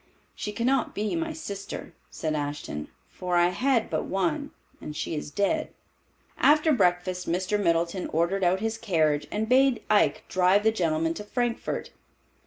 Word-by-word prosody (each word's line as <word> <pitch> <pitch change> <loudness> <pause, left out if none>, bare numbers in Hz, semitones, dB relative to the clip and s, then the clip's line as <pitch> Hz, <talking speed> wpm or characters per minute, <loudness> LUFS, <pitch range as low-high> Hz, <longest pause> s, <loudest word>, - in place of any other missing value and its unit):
"She 210 - -5
cannot 245 +4 0
be 210 +8 -1
my 330 -1 -2
sister," 200 - -7 0.2
said 155 -1 -3
Ashton, 145 - -4 0.2
"for 180 -1 -3
I 175 0 +5
had 245 +4 +1
but - - -2
one, 195 - -1 0.3
and 150 - -7
she - - -3
is 150 -1 -4
dead." 200 - 0 0.7
After 305 +2 +5
breakfast 180 -4 +1
Mr. 185 +4 0
Middleton 170 +1 +1
ordered 170 +5 0
out 185 +2 +2
his 225 0 -2
carriage 155 -9 +1
and 215 +1 -2
bade 260 -1 +4
Ike 210 - +3
drive 185 +2 +3
the 220 - +4
gentlemen 165 -5 0
to 210 - -7
Frankfort. 240 +2 -2
195 Hz, 155 wpm, -27 LUFS, 170-230 Hz, 0.7 s, I